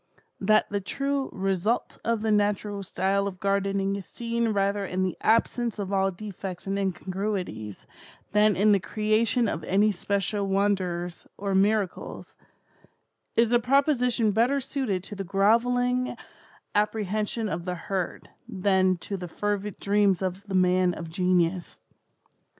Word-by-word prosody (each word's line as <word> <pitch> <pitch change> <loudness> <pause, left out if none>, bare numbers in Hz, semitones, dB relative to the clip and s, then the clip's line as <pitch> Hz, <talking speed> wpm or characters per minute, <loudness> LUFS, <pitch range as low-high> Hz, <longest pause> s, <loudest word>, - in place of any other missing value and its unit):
That 215 +2 +3
the 205 -1 -1
true 275 +7 -2
'result 195 +4 -1
of 230 -2 0
the 220 - +1
natural 205 -1 +1
style 195 +1 0
of 185 -2 -6
gardening 195 0 0
is 195 -3 -7
seen 235 0 -2
rather 200 -1 +1
in 185 -1 -1
the 185 -2 -1
absence 230 +1 +1
of 200 -1 -4
all 195 0 +3
defects 190 -1 -7
and 195 0 -1
incongruities, 185 - -3 0.5
than 210 -1 +4
in 210 +3 +4
the 200 - +5
creation 220 +4 +1
of 160 -5 -3
any 205 +3 +3
special 200 +1 -1
wonders 185 -3 -1
or 200 0 -2
miracles,' 200 0 0 1.0
is 230 +1 +3
a 240 - +6
proposition 250 -3 +2
better 240 +7 +2
suited 250 -9 -2
to 205 - -7
the 195 - -4
grovelling 245 +6 +2 0.6
apprehension 215 +1 0
of 170 -2 -4
the 180 -1 -2
herd, 185 +1 -4 0.2
than 190 -3 +2
to 195 +3 -5
the 180 -1 -6
fervid 205 +3 -3
dreams 200 -2 +2
of 185 +1 -2
the 195 - -3
man 180 -1 +3
of 160 0 -7
genius. 180 0 0
200 Hz, 140 wpm, -26 LUFS, 185-215 Hz, 1.0 s, a